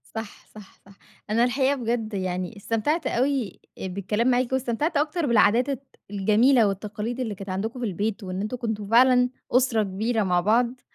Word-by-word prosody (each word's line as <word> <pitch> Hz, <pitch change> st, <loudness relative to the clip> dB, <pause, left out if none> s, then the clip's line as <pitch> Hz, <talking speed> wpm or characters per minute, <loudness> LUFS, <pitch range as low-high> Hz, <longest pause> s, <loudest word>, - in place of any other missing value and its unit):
صح، 220 Hz, -2 st, -7 dB
صح، 210 Hz, -2 st, -15 dB
صح، 200 Hz, 0 st, -18 dB, 0.3 s
أنا 230 Hz, +3 st, +3 dB
الحقيقة 265 Hz, +3 st, +2 dB
بجَد 230 Hz, -3 st, -2 dB
يعني 185 Hz, +1 st, -3 dB
استمتعت 230 Hz, -, -1 dB
أوي 255 Hz, -5 st, -1 dB, 0.2 s
بالكلام 200 Hz, +5 st, -2 dB
معاكِ 250 Hz, 0 st, +2 dB
واستمتعت 265 Hz, +5 st, 0 dB
أكتر 305 Hz, +3 st, 0 dB
بالعادات 235 Hz, +1 st, +3 dB
الت 275 Hz, -1 st, -3 dB, 0.3 s
الجميلة 215 Hz, +4 st, +4 dB
والتقاليد 210 Hz, +4 st, -4 dB
اللي 225 Hz, -5 st, -3 dB
كانت 195 Hz, +1 st, -9 dB
عندكم 220 Hz, +7 st, -3 dB
في 245 Hz, -, -2 dB
البيت 210 Hz, +2 st, -2 dB
وإن 185 Hz, 0 st, -4 dB
أنتم 215 Hz, +5 st, -3 dB
كنتم 220 Hz, -4 st, -4 dB
فعلًا 250 Hz, +2 st, +5 dB, 0.2 s
أسرة 245 Hz, -3 st, +3 dB
كبيرة 215 Hz, +3 st, -1 dB
مع 180 Hz, -2 st, +2 dB
بعض 240 Hz, +5 st, +1 dB
225 Hz, 165 wpm, -25 LUFS, 205-250 Hz, 0.3 s, فعلًا